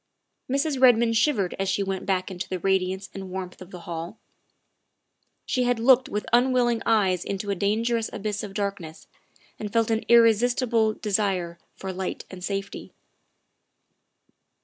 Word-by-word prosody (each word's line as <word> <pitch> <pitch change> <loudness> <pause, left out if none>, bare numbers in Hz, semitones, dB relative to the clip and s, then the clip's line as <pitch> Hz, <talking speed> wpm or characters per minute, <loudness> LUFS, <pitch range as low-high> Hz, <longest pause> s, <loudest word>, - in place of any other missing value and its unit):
Mrs. 275 0 0
Redmond 235 -2 +5
shivered 220 -6 +1
as 195 0 0
she 200 +1 0
went 190 -1 -4
back 185 0 0
into 180 -1 -6
the 185 - -2
radiance 190 +1 0
and 190 -1 -7
warmth 185 -1 -6
of 185 - -10
the 180 -3 -10
hall. 170 +4 -6 1.3
She 255 - 0
had 245 -1 +1
looked 255 +2 +4
with 210 - -3
unwilling 245 -2 +3
eyes 195 -5 +2
into 200 +1 -3
a - - 0
dangerous 225 +4 0
abyss 210 0 -3
of 200 -2 -8
darkness 200 -6 -4 0.5
and 210 -1 -5
felt 230 0 +1
an 220 0 0
irresistible 230 -1 +4
desire 190 -5 -1 0.2
for 190 -1 -6
light 185 0 -4
and 185 -1 -9
safety. 195 +1 -5
205 Hz, 150 wpm, -25 LUFS, 190-230 Hz, 1.3 s, Redmond